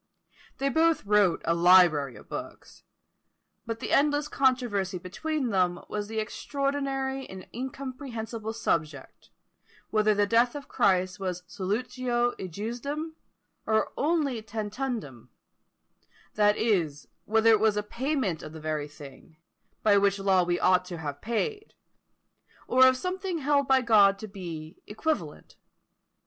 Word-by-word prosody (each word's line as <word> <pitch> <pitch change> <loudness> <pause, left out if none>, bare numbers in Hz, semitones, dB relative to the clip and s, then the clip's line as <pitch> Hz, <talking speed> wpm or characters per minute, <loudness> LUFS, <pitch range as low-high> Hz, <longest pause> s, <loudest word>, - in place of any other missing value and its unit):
They 275 +1 0
both 320 -1 +2
wrote 205 -3 +3
a 165 - +2
library 170 -6 +5
of - - -14
books; - - -8 0.8
but 230 0 -4
the - - -5
endless 290 +1 +3
controversy 245 -10 +1
between 265 - -3
them 180 -3 +1
was 210 -1 -3
the 220 +1 -6
extraordinary 270 +3 -2
and 190 -1 -9
incomprehensible 245 -4 -5
subject, 155 -10 -3 0.6
whether 215 -1 +3
the 205 0 +3
death 235 +5 +2
of 285 -1 -7
Christ 185 0 +1
was 180 -2 -4
solutio 240 +6 -1
ejusdem, 240 - -4 0.6
or 220 0 +1
only 290 -6 0
tantundem; 215 - -5 1.0
that 210 0 +3
is, 165 -10 0 0.2
whether 225 +1 +4
it 220 - +5
was 215 -1 +2
a 210 - 0
payment 235 - -2
of 155 - -9
the 160 - -8
very 155 -1 -3
thing, 145 +1 -14 0.5
which 200 -1 +4
by 195 - -7
law 190 -2 +4
we 175 0 0
ought 185 0 +4
to 180 -1 -7
have 145 -3 -6
paid, 410 - -3 0.9
or 260 0 +6
of 260 0 +3
something 370 +3 -3
held 285 -2 +1
by 265 -1 +4
God 205 -5 +5
to 215 - -8
be 170 -5 -8
equivalent. 210 - -4
215 Hz, 135 wpm, -27 LUFS, 185-265 Hz, 1.0 s, or